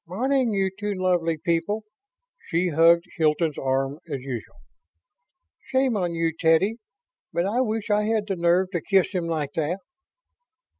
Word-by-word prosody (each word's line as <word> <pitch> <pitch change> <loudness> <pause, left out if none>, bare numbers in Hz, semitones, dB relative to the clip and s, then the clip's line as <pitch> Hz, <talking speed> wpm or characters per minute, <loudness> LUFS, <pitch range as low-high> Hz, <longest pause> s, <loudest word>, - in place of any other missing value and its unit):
"Morning, 255 +7 +1
you 195 -2 0
two 205 +1 -3
lovely 175 -3 +1
people." 170 +7 -1 0.6
She 175 +1 +1
hugged 165 +2 +5
Hilton's 155 -1 +1
arm 135 +2 -1
as 140 -3 -3
usual. 125 -4 -6 1.1
"Shame 260 -2 +1
on 175 -4 -1
you, 165 -1 0
Teddy. 165 +7 +3 0.5
But 170 - 0
I 225 +6 +1
wish 220 -3 -2
I 210 0 +2
had 220 -1 +1
the 195 - -1
nerve 175 +2 +2
to 175 - -2
kiss 195 -2 +2
him 180 -4 -2
like 155 -4 -2
that." 160 +3 -1
175 Hz, 150 wpm, -24 LUFS, 165-205 Hz, 1.1 s, hugged